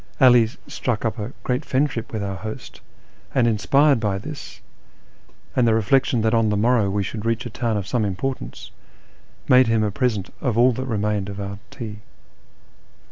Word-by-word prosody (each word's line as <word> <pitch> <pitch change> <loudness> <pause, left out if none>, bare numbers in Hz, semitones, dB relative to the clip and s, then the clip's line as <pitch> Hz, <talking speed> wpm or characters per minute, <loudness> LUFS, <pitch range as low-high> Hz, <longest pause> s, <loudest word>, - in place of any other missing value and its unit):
'All 125 -4 +7 0.2
struck 120 -3 -2
up 115 +1 -1
a 105 +4 -4
great 125 +3 -1
friendship 135 -4 -1
with 110 -2 -3
our 100 -1 -3
host, 110 +1 -8 0.5
and, 130 -3 +4
inspired 135 +5 +3
by 105 -3 0
this, 140 +8 -8 1.0
and 125 -2 +3
the 110 - +4
reilection 115 +1 +2
that 110 +1 +2
on 115 -2 +3
the 105 - +1
morrow 115 -1 +3
we 100 +1 0
should 105 +2 -5
reach 115 +1 -1
a 120 - -6
town 115 -1 -1
of 100 - -3
some 115 +2 0
importance, 105 +7 -4 0.8
made 130 -1 +6
him 115 -1 +2
a 105 - 0
present 110 -4 -1
of 125 -6 0
all 125 +2 +6
that 130 +2 -4
remained 105 -3 -1
of 100 0 -7
our 100 0 -5
tea. 110 -5 -7
115 Hz, 180 wpm, -22 LUFS, 105-125 Hz, 1.0 s, All